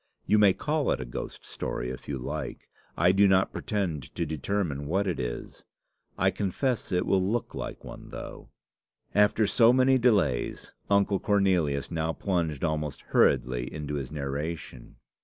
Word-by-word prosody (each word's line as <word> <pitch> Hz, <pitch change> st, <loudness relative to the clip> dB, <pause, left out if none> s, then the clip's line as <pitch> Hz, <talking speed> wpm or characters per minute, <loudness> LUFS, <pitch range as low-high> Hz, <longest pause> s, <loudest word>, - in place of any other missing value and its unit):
You 105 Hz, -, +4 dB
may 100 Hz, -2 st, +6 dB
call 150 Hz, +3 st, -1 dB
it -, -, +1 dB
a 65 Hz, -, -4 dB
ghost -, -, -7 dB
story 60 Hz, +1 st, -4 dB
if 65 Hz, -, -9 dB
you 70 Hz, -, -2 dB
like; 65 Hz, -, -6 dB, 0.3 s
I 85 Hz, +3 st, +5 dB
do 100 Hz, +1 st, +5 dB
not 95 Hz, 0 st, +3 dB
pretend 95 Hz, -, -3 dB
to 85 Hz, -, -1 dB
determine 80 Hz, -1 st, -2 dB
what 95 Hz, +6 st, +1 dB
it 90 Hz, -3 st, -2 dB
is. -, -, -5 dB, 0.5 s
I -, -, +3 dB
confess 115 Hz, +6 st, -1 dB
it 90 Hz, -1 st, +1 dB
will 95 Hz, -1 st, +3 dB
look 105 Hz, +5 st, -1 dB
like -, -, -6 dB
one, -, -, -10 dB
though." -, -, -8 dB, 0.6 s
After 105 Hz, +1 st, +4 dB
so 115 Hz, +3 st, +5 dB
many 130 Hz, +1 st, +4 dB
delays, 105 Hz, -, +1 dB, 0.2 s
Uncle 100 Hz, -1 st, +3 dB
Cornelius 90 Hz, -9 st, +1 dB
now 80 Hz, -1 st, -1 dB
plunged 85 Hz, -8 st, -1 dB
almost 75 Hz, -3 st, -2 dB
hurriedly 60 Hz, -1 st, +2 dB
into 75 Hz, -1 st, -5 dB
his 70 Hz, -3 st, -4 dB
narration. 70 Hz, -2 st, -5 dB
90 Hz, 155 wpm, -28 LUFS, 75-100 Hz, 0.6 s, may